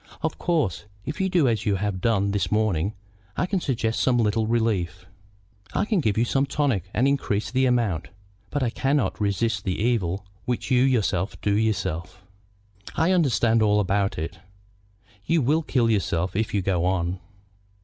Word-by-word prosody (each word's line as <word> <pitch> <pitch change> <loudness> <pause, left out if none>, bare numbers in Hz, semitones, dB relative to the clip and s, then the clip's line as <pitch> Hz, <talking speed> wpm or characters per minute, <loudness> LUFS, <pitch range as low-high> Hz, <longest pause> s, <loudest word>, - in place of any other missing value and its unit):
Of 160 - -2
course, 155 - 0 0.2
if 150 +7 -4
you 190 - +1
do 175 -7 +3
as 110 -3 0
you 100 - +3
have 95 -1 -2
done 100 -3 +1
this 100 0 -1
morning, 105 -2 +1 0.4
I - - +1
can 185 0 -1
suggest 115 -6 -1
some 125 -2 +3
little 110 -1 +1
relief. 100 -6 0 0.7
I - - +2
can 210 -3 +1
give 110 -8 0
you 115 - +3
tonics 135 - 0
and 125 +5 +2
increase 120 -7 0
the 130 +1 +2
amount; 115 -10 0 0.4
but 145 +3 -1
I 120 - 0
cannot 135 -6 0
resist 105 +3 0
the 95 -2 -2
evil 100 -5 0 0.2
which 125 +1 -2
you 125 -1 +5
yourself 110 -8 +1
do 100 -1 +1
yourself." 95 -4 -2 0.7
"I 165 +3 +2
understand 120 -10 +3
all 105 -1 +3
about 100 0 0
it." 85 +2 -5 0.8
"You 165 +7 +2
will 150 +6 +2
kill 125 -6 +1
yourself 95 -4 0
if 110 +1 0
you 100 -2 0
go 90 -3 +1
on." 90 0 0
110 Hz, 170 wpm, -24 LUFS, 95-130 Hz, 0.8 s, you